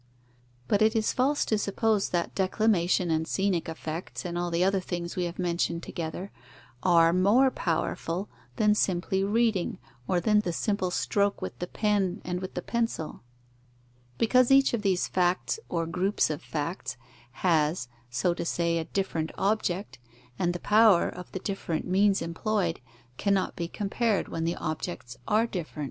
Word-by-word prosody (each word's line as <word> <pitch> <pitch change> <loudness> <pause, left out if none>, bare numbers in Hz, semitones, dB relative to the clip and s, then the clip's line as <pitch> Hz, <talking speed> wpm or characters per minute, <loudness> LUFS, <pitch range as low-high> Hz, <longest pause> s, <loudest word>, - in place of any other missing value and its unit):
But 205 - +2
it 220 +1 +4
is 220 -1 +1
false 275 +3 +2
to 215 - +1
suppose 210 0 +1
that 175 -1 -1
declamation 185 -3 +2
and 160 0 0
scenic 190 -4 0
effects, 160 +3 -6
and 175 -1 -3
all 175 0 -1
the 170 +1 +1
other 195 +1 +2
things 175 -1 -4
we 180 - 0
have 170 0 -5
mentioned 170 -1 -1
together, 170 +4 -5 0.5
are 170 -2 +5
more 210 +9 +4
powerful 170 +1 -2 0.3
than 210 -2 +4
simply 190 -1 0
reading, 215 -1 +1 0.3
or 180 - +2
than 210 +4 +3
the 180 -5 -1
simple 200 +1 0
stroke 200 +2 0
with - - -6
the 180 - -3
pen 200 -3 0
and 180 0 -2
with 185 - -6
the 180 - -3
pencil; 230 -9 -2 1.0
because 250 +2 +4
each 270 -1 +5
of 235 - 0
these 190 -3 +1
facts 180 - 0
or 165 -1 -1
groups 180 +1 +1
of 150 - -4
facts 160 -1 -4 0.5
has, 155 -5 +2 0.2
so 130 +9 +1
to 170 - -4
say, 170 0 0
a 160 - -3
different 165 -5 -2
object, 195 - -1 0.4
and 175 - +2
the 175 - -4
power 210 -3 +5
of 180 -1 -9
the - - -4
different 185 -5 -3
means 195 0 +3
employed 170 +1 -1 0.4
cannot 200 -2 +1
be 170 - -3
compared 205 +2 -1
when 165 0 -2
the 170 - 0
objects 155 -5 -5
are 220 +1 +3
different. 175 -9 -6
185 Hz, 160 wpm, -28 LUFS, 170-210 Hz, 1.0 s, are